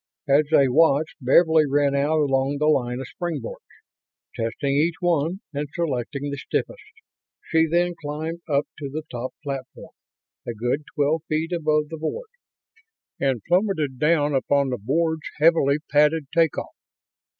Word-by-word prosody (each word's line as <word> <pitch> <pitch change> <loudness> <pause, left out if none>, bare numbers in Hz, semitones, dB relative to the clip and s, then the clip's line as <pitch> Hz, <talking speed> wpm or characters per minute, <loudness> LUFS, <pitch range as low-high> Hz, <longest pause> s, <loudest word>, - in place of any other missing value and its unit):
As 145 +2 +4
they 145 -4 +5
watched, 150 +2 +3
Beverly 160 +4 +4
ran 140 0 +2
out 145 +3 +1
along 135 0 +1
the 150 - 0
line 125 -5 +1
of 135 - -5
springboards; 155 -5 -5 0.7
testing 115 +5 -2
each 160 +3 +2
one 175 +1 0
and 145 +1 -3
selecting 140 -4 -2
the 140 - -4
stiffest. - - -3 0.6
She 160 0 +2
then 175 +2 +1
climbed 155 +3 -4
up 140 -1 +2
to 140 -2 -5
the 155 +3 -5
top 125 +1 -5
platform 135 -3 -7 0.6
a 120 - -3
good 125 +7 -2
twelve 150 +2 +1
feet 160 +2 -1
above 155 -3 +1
the 160 - -6
board 440 - -4 0.9
and 135 -5 0
plummeted 170 -8 +1
down 150 -1 +2
upon 140 +1 +1
the 125 -2 -3
board's 160 +7 -1
heavily 150 -2 +4
padded 150 +1 +3
take 165 -2 +2
off. - - -5
150 Hz, 150 wpm, -23 LUFS, 140-160 Hz, 0.9 s, they